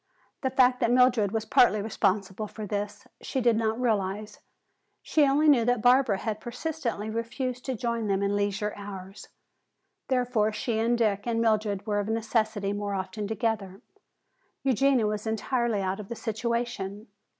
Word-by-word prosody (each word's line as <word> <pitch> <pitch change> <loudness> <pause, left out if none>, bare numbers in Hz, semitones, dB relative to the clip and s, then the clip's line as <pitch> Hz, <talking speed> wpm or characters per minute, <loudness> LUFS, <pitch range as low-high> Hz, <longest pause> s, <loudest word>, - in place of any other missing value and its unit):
The 265 - 0
fact 255 -1 +4
that 235 -4 +2
Mildred 245 -5 +4
was 220 0 -2
partly 215 0 +4
responsible 200 -1 -1
for 215 0 -7
this, 205 0 -4 0.2
she 265 - -2
did 235 -2 +3
not 220 +1 0
realize. 210 -3 -1 0.6
She 300 -3 +3
only 290 +3 +3
knew 270 -6 +6
that 245 -2 +1
Barbara 245 -4 +4
had 215 +1 -3
persistently 240 -3 -4
refused 240 +3 -3
to 260 - -2
join 235 -1 -2
them 195 0 +1
in 200 0 +1
leisure 205 +1 -1
hours. 195 -1 -9 0.8
Therefore 245 -4 +1
she 220 +1 -2
and 235 +2 +2
Dick 210 -2 0
and 230 -1 0
Mildred 215 -3 +1
were 205 -2 0
of 205 - -2
necessity 220 -2 0
more 205 -1 -3
often 190 +2 -4
together; 210 -3 -2 0.8
Eugenia 265 -2 +3
was 210 +1 -2
entirely 225 -1 0
out 190 +2 -2
of 205 - -8
the 235 - -4
situation. 225 -3 -3
220 Hz, 160 wpm, -27 LUFS, 205-240 Hz, 0.8 s, knew